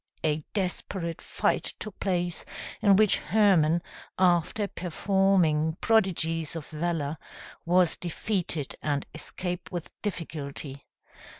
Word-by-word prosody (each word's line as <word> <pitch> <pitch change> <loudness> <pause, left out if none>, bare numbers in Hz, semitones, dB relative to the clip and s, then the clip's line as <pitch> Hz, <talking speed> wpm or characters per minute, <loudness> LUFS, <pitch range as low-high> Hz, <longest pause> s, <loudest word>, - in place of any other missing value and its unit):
A 155 -1 +1
desperate 180 -3 -2
fight - - 0
took 215 - -7
place, 175 -3 0 0.4
in 200 -3 +6
which 215 0 +5
Hermann, 175 -4 +3 0.3
after 180 +3 +3
performing 175 -4 +2
prodigies 165 -8 +1
of 160 -3 -5
valor, 155 -2 -2 0.5
was 180 -1 +4
defeated, 175 -4 -2
and 145 -2 -1
escaped 180 -1 -5
with 175 -3 -5
difficulty. 145 -7 -5
175 Hz, 100 wpm, -28 LUFS, 155-195 Hz, 0.5 s, in